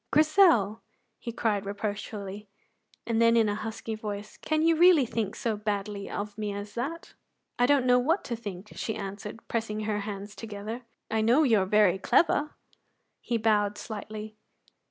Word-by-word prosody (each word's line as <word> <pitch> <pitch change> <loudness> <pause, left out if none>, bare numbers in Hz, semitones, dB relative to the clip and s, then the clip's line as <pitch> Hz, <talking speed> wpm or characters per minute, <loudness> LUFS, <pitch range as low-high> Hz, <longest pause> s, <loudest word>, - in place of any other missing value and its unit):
"Grizel!" 305 - +4 0.4
he 235 - -5
cried 215 -4 0
reproachfully, 205 0 -5 0.6
and 230 -1 +1
then 230 0 +5
in 225 -2 +4
a 205 - 0
husky 220 +1 -5
voice: 210 -1 -6
"Can 310 0 0
you 330 0 +4
really 340 -4 +6
think 220 -3 -2
so 225 -2 -1
badly 205 -1 -3
of 205 +1 -5
me 210 -1 -2
as 205 0 -7
that?" 285 +9 -5 0.5
"I 245 - +5
don't 280 -2 +4
know 250 0 +5
what 320 +10 +1
to 240 - -3
think," 205 -3 -8
she 220 - -3
answered, 205 +3 -7
pressing 220 -2 -2
her 210 -1 -1
hands 205 0 -6
together, 215 +3 -6 0.3
"I 220 0 +1
know 240 +8 +4
you 230 -7 +4
are 190 - 0
very 195 -2 +4
clever." 300 - +2 0.7
He 235 - -1
bowed 210 -2 +2
slightly. 215 0 -7
215 Hz, 165 wpm, -28 LUFS, 205-235 Hz, 0.7 s, really